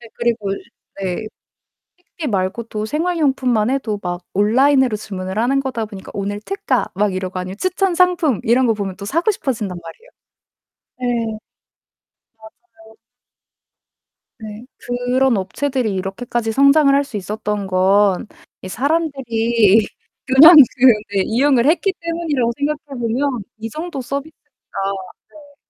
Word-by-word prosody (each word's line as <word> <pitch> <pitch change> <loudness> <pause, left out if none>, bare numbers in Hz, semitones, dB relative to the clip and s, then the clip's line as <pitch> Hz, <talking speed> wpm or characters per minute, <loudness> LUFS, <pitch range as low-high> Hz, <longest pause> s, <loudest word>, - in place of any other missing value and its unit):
네. 235 - -13
그리고 235 -4 -1 0.5
네. 190 +2 -3 0.7
식비 345 -3 -8
말고 195 +2 -1
또 215 -1 -5
생활용품만 270 -7 0
해도 240 -6 -2
막 175 0 -4
온라인으로 250 +3 +3
주문을 190 -2 -6
하는 250 +5 +2
거다 255 -5 -3
보니까 200 -3 -11
오늘 205 +1 -3
특가 390 - -1
막 205 -1 +1
이러고 185 0 -4
아니면 185 +2 -6
추천상품 360 - +1
이런 245 +3 +3
거 230 - +3
보면 200 -3 -4
또 200 - -8
사고 335 - 0
싶어진단 220 - -3
말이에요. 445 - -13 0.9
네. 230 -3 -2 1.0
맞아요. 220 0 -18 1.4
네. 215 +1 -9 0.5
그런 265 -4 +3
업체들이 245 +4 -2
이렇게까지 225 +5 -3
성장을 275 +3 +5
할 280 - +3
수 275 -6 -6
있었던 210 +1 -4
건 190 +2 +2 0.4
이 - - -6
사람들이 235 - +1 0.4
그냥 305 +6 +9 0.2
그 255 - +4 0.3
네 190 - +3
이용을 250 +1 +2
했기 350 +6 +2
때문이라고 330 -8 -1
생각해 290 -2 -3
보면 240 +1 -1
이 220 +1 -5
정도 310 -1 -5
서비스가 275 +3 -3 1.2
네. 285 -1 -19
235 Hz, 285 characters per minute, -19 LUFS, 210-280 Hz, 1.4 s, 그냥